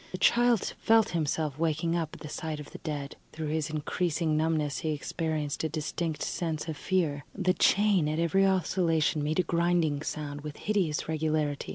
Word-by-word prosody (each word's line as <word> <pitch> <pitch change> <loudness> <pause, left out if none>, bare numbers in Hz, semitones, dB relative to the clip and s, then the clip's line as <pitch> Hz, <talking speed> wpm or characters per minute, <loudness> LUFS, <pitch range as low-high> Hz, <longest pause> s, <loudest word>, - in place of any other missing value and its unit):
The 185 - -4
child 240 0 +3
felt 225 -1 +4
himself 155 -3 -1
waking 165 +1 +1
up 165 -3 -1
at - - -14
the 150 - -6
sight 155 0 -4
of 150 - -9
the - - -9
dead; 145 -3 -5 0.2
through 155 -1 -4
his 155 0 -1
increasing 155 +1 -1
numbness 155 -2 0
he 155 -1 -1
experienced 155 0 -2
a 160 - 0
distinct 155 +1 -3
sense 160 -2 -2
of 160 - -3
fear. 150 -4 0
The 185 -2 +2
chain 195 -7 +3
at 155 - -1
every 170 +4 +3
oscillation 165 -4 +1
made 155 +2 -1
a 185 - +4
grinding 170 -4 +1
sound, 145 -2 -4
with 150 0 -7
hideous 190 -8 0
regularity. 155 -2 -1
160 Hz, 180 wpm, -29 LUFS, 150-175 Hz, 0.2 s, felt